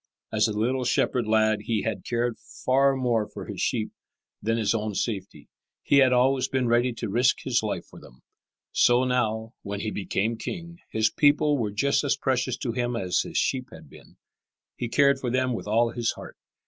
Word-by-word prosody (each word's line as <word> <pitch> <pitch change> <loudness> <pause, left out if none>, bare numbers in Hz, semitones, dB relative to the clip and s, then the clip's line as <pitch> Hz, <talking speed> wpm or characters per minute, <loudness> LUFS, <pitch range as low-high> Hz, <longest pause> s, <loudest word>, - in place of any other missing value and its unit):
As 105 0 +3
a 110 - -3
little 125 +4 0
shepherd 120 -1 +1
lad 110 -1 +2
he 110 -3 0
had 95 - -3
cared 120 0 -1
far 135 +1 +1
more 120 -5 0
for - - -9
his - - -6
sheep - - -1 0.5
than 115 +1 0
his 110 -2 +1
own 110 -2 -2
safety. 95 -10 -4 0.4
He 140 - +3
had 130 -2 +6
always 130 +1 +3
been 130 -2 0
ready 120 +2 +2
to 115 - -5
risk 120 +5 +2
his - - +1
life - - -3
for - - -14
them. 60 - -17 0.5
So 120 +1 +4
now, 115 -3 -1
when 100 0 -5
he 110 - -3
became 105 +4 -1
king, 170 -1 -6
his 110 0 +1
people 150 0 +3
were 115 -6 -1
just 120 +10 +1
as 140 - +1
precious 130 -2 0
to 120 - -3
him 120 0 -2
as 95 -5 0
his - - -3
sheep 130 -1 0
had - - -13
been. - - -17 0.6
He 120 - -4
cared 140 +1 +3
for 125 - -2
them 130 +1 +1
with 115 - -5
all 115 +2 +2
his 120 -1 -1
heart. - - -11
120 Hz, 200 wpm, -26 LUFS, 110-130 Hz, 0.6 s, had